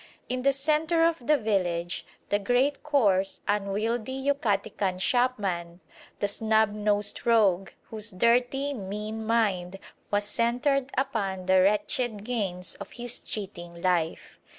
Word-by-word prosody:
In 255 0 -1
the 275 +2 +4
centre 310 +4 +1
of 335 0 +1
the 300 - +5
village 180 -6 -1 0.2
the 205 - +2
great 250 +7 +1
coarse, 200 -10 +2
unwieldy 210 +4 -1
Yucatecan 210 -8 0
shopman, 190 -7 0 0.4
the - - +1
"snubnosed 210 -1 +1
rogue" 200 -5 +3 0.2
whose 215 0 -1
dirty, 245 +7 +2
mean 210 0 -5
mind 200 -5 0 0.3
was 205 0 +1
centred 250 +6 +1
upon 200 -9 -1
the 185 0 +5
wretched 210 +2 +1
gains 195 -6 -3
of - - -10
his 240 0 -5
cheating 175 -5 -6
life. 175 -3 -1
215 Hz, 120 wpm, -27 LUFS, 195-250 Hz, 0.4 s, the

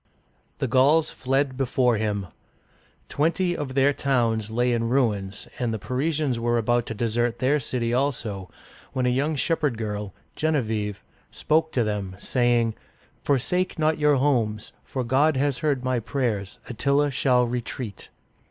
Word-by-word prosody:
• - - -50 0.5
The 135 - -1
Gauls 140 +6 +4
fled 135 +1 0
before 125 -2 +2
him. 105 -2 -1 0.8
Twenty 170 +4 +1
of 135 -4 -5
their 140 +1 +4
towns 115 -6 0
lay 120 +2 +1
in 115 -1 0
ruins, 105 -7 0
and 120 -3 0
the 110 - -2
Parisians 135 - -1
were 120 0 +1
about 120 +1 +1
to 115 - -4
desert 120 +2 0
their 135 +5 +2
city 120 -2 -2
also, 115 -8 -1 0.4
when 130 -1 0
a - - +3
young 140 +5 0
shepherd 145 -4 0
girl, 105 -3 -4 0.2
Gen 155 0 +1
e - - +3
vieve', 105 -3 -3 0.3
spoke 160 +1 +1
to 120 - +2
them, 100 -3 -3
saying: 120 0 +1 0.2
" - - -34
Forsake 160 +7 0
not 155 0 +1
your 150 -1 +4
homes, 120 -6 0
for 130 - -4
God 135 +5 +2
has 140 -1 0
heard 140 -4 0
my 130 -1 +1
prayers. 115 -5 -2
Attila 140 +4 +1
shall 125 -2 +3
retreat." 120 -2 -5
125 Hz, 160 wpm, -25 LUFS, 115-140 Hz, 0.8 s, Gauls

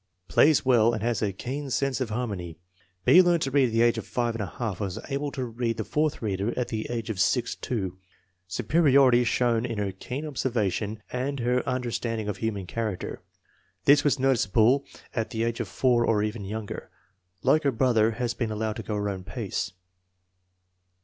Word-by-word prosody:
Plays 150 -2 +4
well 120 -3 +4
and 110 - -4
has 120 0 0
a 105 -2 +1
keen 135 +8 -5
sense 135 +1 0
of 125 - -1
harmony. 100 -8 -4 0.5
B. 180 - +8
learned 175 -2 +3
to 135 - -2
read 140 -1 +4
at - - -4
the 115 +1 +3
age 120 -1 +3
of - - -8
5$, 120 -1 0
and 105 -1 -4
was 100 -4 -3
able 140 +1 -1
to 130 -2 -2
read 115 -1 -2
the 110 - -2
fourth 150 +2 -1
reader 100 +2 -1
at 125 - -1
the 110 -1 -3
age 115 -2 -3
of 100 - -5
6 115 +5 +1
2. 95 -6 -3 0.2
" 90 -1 -45
Superiority 130 - +4
shown 120 -1 +1
in 120 -3 -3
her 100 -1 -1
keen 125 +10 -6
observation 110 - -2
and 135 +2 -2
in 120 - -3
her 125 0 +1
understand 120 -2 -2
ing 105 - -4
of 105 - -3
human 105 -4 -2
character. 110 -1 -4 0.6
This 145 +1 +6
was 145 -1 +2
noticeable 130 0 +3 0.3
at 115 -3 -2
the 110 +1 -2
age 115 0 -1
of - - -2
4, 125 -2 +2
or 110 -3 +2
even 105 -1 -3
younger." 105 +1 -6 0.5
Like 155 - +4
her 140 - +2
brother, 115 -3 +3
has 120 +1 -2
been 120 -3 -2
allowed 110 0 -2
to - - -4
go 105 - -4
her 105 0 -1
own 95 -2 -5
pace. 105 +1 -3
115 Hz, 195 wpm, -26 LUFS, 105-130 Hz, 0.6 s, B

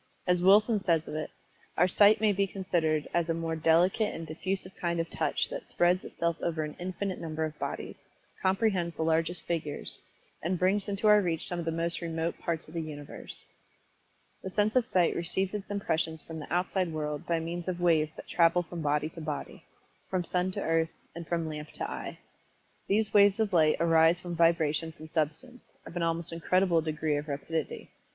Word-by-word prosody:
As 180 -1 +2
Wilson 210 +4 +5
says 170 -5 +1
of - - -6
it, 155 0 -3 0.5
"Our 180 - +5
sight 205 +3 +5
may 215 -1 +3
be 200 0 +1
considered 165 -6 0
as 170 -1 +1
a 165 - +1
more 165 0 -2
delicate 175 +7 +3
and 165 - -6
diffusive 185 +4 -2
kind 170 -1 -1
of 165 0 -2
touch - - 0
that - - -6
spreads 175 +1 +2
itself 170 -1 -2
over 160 -2 -1
an 150 -1 -6
infinite 185 +1 -3
number 160 -1 -2
of 155 -1 -7
bodies; - - -5 0.4
comprehends 190 -3 +1
the 160 - -2
largest 165 +2 0
figures, 155 -4 -4 0.4
and 180 +3 -1
brings 195 +3 +1
into 200 +1 -2
our 210 0 +7
reach 170 -4 0
some 175 - -1
of 170 - -4
the 165 - 0
most 165 +2 -1
remote 165 0 -2
parts 165 -2 -3
of 155 - -13
the 165 - -2
universe." 145 -2 -8 1.0
The 190 - -5
sense 210 +4 +1
of 250 -3 +3
Sight 180 -2 +2
receives 185 +3 -1
its 205 -2 -5
impressions 160 -5 -1
from 160 -1 -7
the 150 - -9
outside 180 0 0
world 150 -2 -4
by 170 -1 +1
means 170 +2 -5
of 180 -1 -2
waves 160 -3 +2
that - - -10
travel 175 +1 +3
from 170 0 -7
body 150 +1 +1
to 165 - -10
body 150 -2 -5 0.4
from 185 -2 0
sun 180 +1 0
to 200 - -3
earth, 165 0 +2 0.2
and 170 -1 -8
from 165 -2 -1
lamp 150 -1 -6
to - - -3
eye. - - -6 0.7
These 215 +1 +1
waves 200 0 +6
of 215 -3 0
light 155 -3 +4
arise 165 +1 +4
from 175 -1 -5
vibrations 165 -1 +2
in 155 0 -11
substance, 160 - -2 0.2
of - - -10
an 175 - -1
almost 165 0 -1
incredible 170 0 +2
degree 155 -1 -1
of 145 +1 -4
rapidity. 150 +2 -4
170 Hz, 195 wpm, -29 LUFS, 160-185 Hz, 1.0 s, our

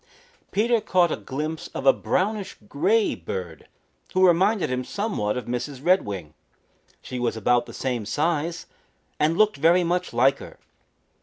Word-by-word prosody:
Peter 230 +2 +2
caught 180 -5 +2
a - - 0
glimpse 155 +4 -5
of - - -4
a 135 - +7
brownish 205 +1 -2
gray 215 - +2
bird 85 -2 -7 0.5
who 185 0 +5
reminded 185 - +3
him 125 0 -1
somewhat 125 - -2
of 125 - -4
Mrs. 125 +3 -4
Redwing. 100 - +1 0.7
She 125 - -5
was 120 -2 -1
about 120 +3 +2
the - - -9
same 120 -5 -3
size 160 +4 -1 0.5
and 160 +3 +2
looked 215 -5 +3
very 170 +5 +4
much 180 +1 -1
like 130 +4 +3
her. - - -11
150 Hz, 150 wpm, -24 LUFS, 125-185 Hz, 0.7 s, a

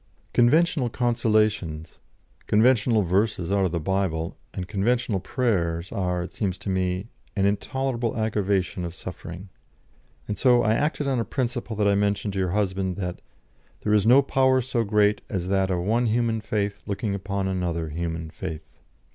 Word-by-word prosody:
Conventional 145 +2 +3
consolations, 110 -9 0 0.5
conventional 110 -1 +4
verses 95 0 0
out 100 -1 +3
of 90 - 0
the 85 - -1
Bible, 85 -2 -1 0.2
and 90 -1 -5
conventional 110 +1 0
prayers 90 -6 -1
are, 90 -4 -1
it 85 - -9
seems 95 -4 -2
to 100 - -4
me, 95 0 -1 0.3
an 100 -2 +2
intolerable 120 +3 -1
aggravation 100 -4 0
of 85 0 -5
suffering. 90 +1 -8 0.8
And 105 - -3
so 125 -2 +5
I 110 0 +3
acted 145 +2 0
on 130 -3 +1
a - - +1
principle 120 0 -3
that 105 -1 +2
I 100 - +4
mentioned 100 0 0
to 95 - -2
your 95 -1 +1
husband 95 -1 -1
that 90 -3 -4 0.6
'there 105 - +1
is 105 0 +3
no 130 +4 +7
power 130 -1 +3
so 120 -2 0
great 105 0 +2
as 95 -2 -3
that 95 -1 +2
of 90 -2 0
one 115 +6 +1
human 115 0 +1
faith 105 -1 -2
looking 100 +1 -2
upon 100 0 -2
another 85 -4 -2
human 80 0 -4
faith.' 80 0 -8
100 Hz, 165 wpm, -25 LUFS, 90-115 Hz, 0.8 s, no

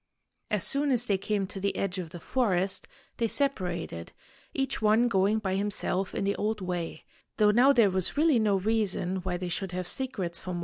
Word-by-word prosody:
As - - +1
soon 285 0 +2
as 245 -2 +2
they 200 -5 +1
came 200 0 -1
to 195 +1 -7
the 200 +1 -1
edge 195 -1 -2
of 175 -3 -5
the 175 - -9
forest, 195 -3 0 0.3
they 230 - +1
separated, 180 - -2 0.4
each 270 -3 -2
one 220 +3 +4
going 200 0 +2
by 195 -4 -2
himself 195 -1 -2
in - - -1
the 200 0 +1
old 215 +1 -1
way, 175 -4 -4 0.3
though 210 -1 +5
now 245 +6 +6
there 230 -7 +4
was 185 +6 -1
really 305 -5 +4
no 210 -2 +2
reason 195 -2 0
why 180 -1 -3
they 180 0 -4
should 180 +2 -3
have 180 0 -3
secrets 190 -7 -2
from 185 - -6
one - - -3
another. - - -3
195 Hz, 210 wpm, -28 LUFS, 185-225 Hz, 0.4 s, now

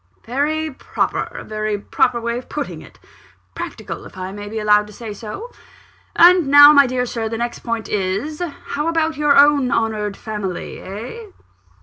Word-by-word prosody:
"Very 305 +6 -1
proper 265 - -2
a - - -9
very 215 -1 -3
proper 235 +4 0
way 235 +1 -2
of 250 - -14
putting - - -5
it. - - -16 0.6
Practical, - - -7
if - - -16
I 185 0 -5
may 205 +1 -8
be 220 - -6
allowed 210 -1 +3
to 210 - -13
say 220 0 -7
so. 230 - -8 0.6
And 350 -2 +6
now, 290 +1 +9
my 280 -2 +6
dear 250 0 -1
Sir, 230 -2 -3
the 225 - -3
next 240 +1 -3
point 230 -2 -4
is: 210 - -2 0.3
how 295 +3 -2
about 325 -1 0
your 295 -1 +3
own 285 -2 +5
honoured 215 -3 -1
family 210 -5 -5
eh?" 230 - -8
235 Hz, 175 wpm, -19 LUFS, 210-290 Hz, 0.6 s, now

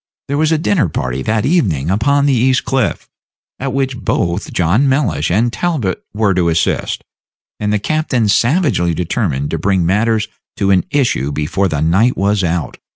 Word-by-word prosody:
There 140 - -1
was 155 0 +2
a 160 - +3
dinner 165 - +1
party 65 -2 -3
that 110 +6 0
evening 95 - +1
upon 140 +8 +2
the 140 - +3
East 130 +2 +2
Cliff, 130 -5 -1 0.5
at 135 0 -3
which 135 0 -1
both 90 -2 -1
John 95 +11 +2
Mellish 95 - 0
and 115 +7 +1
Talbot 150 - -2
were 105 -2 +1
to 90 -2 +1
assist, 80 0 -1 0.6
and 105 0 -1
the 105 - +2
captain 130 -1 0
savagely 115 - +2
determined 80 - -2
to 80 - -2
bring 95 -2 +1
matters 105 +4 +1 0.3
to 100 0 +1
an 90 -3 +3
issue 120 - 0
before 80 +7 -1
the 75 -4 -2
night 95 +11 +2
was 100 0 +1
out. 85 -5 -2
105 Hz, 170 wpm, -16 LUFS, 85-130 Hz, 0.6 s, a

